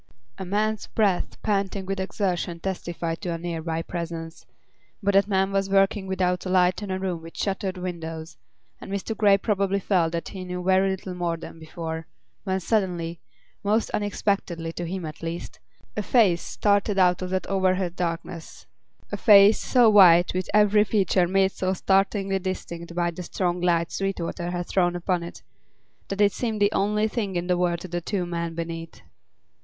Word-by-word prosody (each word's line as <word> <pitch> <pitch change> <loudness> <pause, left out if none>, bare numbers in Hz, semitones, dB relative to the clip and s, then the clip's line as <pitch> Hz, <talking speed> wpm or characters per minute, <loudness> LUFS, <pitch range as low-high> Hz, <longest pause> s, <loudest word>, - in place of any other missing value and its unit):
A 190 - -4
man's 215 +3 -1
breath 200 -5 0
panting 195 -2 -1
with 195 0 -3
exertion 185 -3 -2
testified 170 -3 -4
to 175 - -2
a - - -3
near 165 -1 -4
by 165 0 -2
presence; 165 -1 -6 0.6
but 200 +1 +2
that 195 0 +4
man 195 -1 +1
was 195 0 0
working 195 0 +2
without 180 -1 0
a 185 - -4
light 180 +1 +3
in 205 - -5
a 185 - -1
room 185 -3 -3
with 165 0 -12
shuttered 195 -1 -2
windows, 165 -3 -6 0.4
and - - -9
Mr. 200 +3 -3
Grey 205 -2 +5
probably 200 -1 0
felt 175 -4 +1
that 170 - -3
he 190 -2 -7
knew 180 0 -5
very 190 +1 +3
little 190 -1 -4
more 175 -2 -2
than 165 0 -10
before, 160 0 -6 0.4
when 190 -1 0
suddenly, 175 -5 -1 0.4
most 215 +3 +1
unexpectedly, 200 -5 -1
to 175 0 -4
him 185 0 -4
at 155 -1 -8
least, 165 +1 -6 0.4
a 210 - -1
face 205 -5 +3
started 200 - +1
out 180 -1 +4
of 185 - -3
that 185 0 -1
overhead 185 -2 0
darkness; 170 -1 -5 0.5
a - - -2
face 205 -1 +7
so 245 -3 +4
white, 180 -5 +7
with 185 0 -2
every 210 0 +5
feature 195 -4 +2
made 195 +1 +2
so 185 0 -1
startlingly 195 +1 +1
distinct 170 -2 -5
by 175 -1 +1
the 170 - -8
strong 180 0 -2
light 170 -1 +1
Sweetwater 180 -2 -3
had 175 0 -3
thrown 175 -1 +1
upon 175 0 -1
it, 170 - -9 0.6
that 195 +1 -2
it 205 -1 +5
seemed 225 -3 -2
the 205 0 +3
only 210 +1 +1
thing 210 -4 -3
in 175 0 -1
the 180 0 +2
world 175 -1 0
to - - -7
the 175 0 -3
two 185 0 -2
men 170 -1 -3
beneath. 165 0 -6
185 Hz, 180 wpm, -25 LUFS, 170-195 Hz, 0.6 s, face